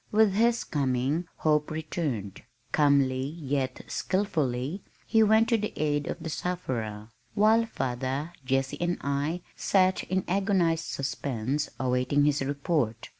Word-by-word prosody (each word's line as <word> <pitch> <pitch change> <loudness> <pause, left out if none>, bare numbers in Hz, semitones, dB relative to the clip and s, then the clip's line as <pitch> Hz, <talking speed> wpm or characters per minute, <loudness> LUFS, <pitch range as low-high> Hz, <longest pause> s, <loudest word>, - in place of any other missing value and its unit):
With 215 -2 +4
his 235 +3 +3
coming 140 +4 0
hope 150 -1 +1
returned. 150 - -3 0.3
Calmly 140 -3 +3 0.2
yet 135 -3 -2
skillfully 155 -4 -1 0.2
he 225 -1 +3
went 220 +1 +5
to 230 -2 +3
the 210 - -3
aid 145 -1 0
of - - -3
the 165 - -3
sufferer, 115 -13 -3 0.2
while 220 +2 +4
father, 135 - -3
Jessie 135 +3 -1
and 175 0 0
I 145 +5 -1
sat 185 -1 +2
in 185 0 0
agonized 180 -4 +1
suspense 140 0 -2
awaiting 130 +3 +2
his 145 -1 +2
report. 140 -4 -1
150 Hz, 125 wpm, -28 LUFS, 130-180 Hz, 0.3 s, went